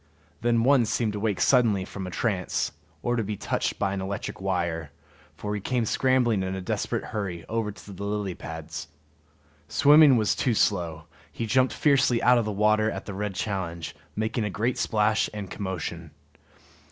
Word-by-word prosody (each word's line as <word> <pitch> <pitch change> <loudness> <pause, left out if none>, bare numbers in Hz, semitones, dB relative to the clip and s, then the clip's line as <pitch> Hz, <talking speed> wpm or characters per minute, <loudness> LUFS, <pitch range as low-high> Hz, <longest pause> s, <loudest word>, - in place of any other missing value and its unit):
Then 115 0 +2
one 130 -2 +5
seemed 110 -1 0
to 105 - -3
wake 105 -2 -1
suddenly 115 -8 +3
from 95 -1 -6
a - - -4
trance, 95 -1 -1 0.3
or 120 0 +1
to 115 - 0
be 105 0 -4
touched - - -1
by 95 - 0
an 100 - -3
electric 95 0 -5
wire, 85 -5 -1 0.5
for 105 0 -4
he 105 - -3
came 125 +2 0
scrambling 125 -3 +2
in 95 0 -2
a - - -4
desperate 90 - -2
hurry 95 -6 -3
over 115 -1 -1
the 100 -1 -9
lily 100 -2 -2
pads. 80 -1 -7 0.8
Swimming 145 - +6
was 110 -2 +2
too 120 -4 0
slow; 85 -7 +1 0.3
he 115 - -4
jumped 130 +3 +3
fiercely 135 -5 +3
out 125 0 +6
of 110 - -1
water 110 +1 +2
at - - -5
the 100 - -6
red 100 0 -3
challenge, 85 -6 -3 0.2
making 110 +2 -1
a 105 - -1
great 115 +6 -1
splash 110 0 +2
and 100 -3 -6
commotion. 90 -4 -4
105 Hz, 175 wpm, -26 LUFS, 95-115 Hz, 0.8 s, Swimming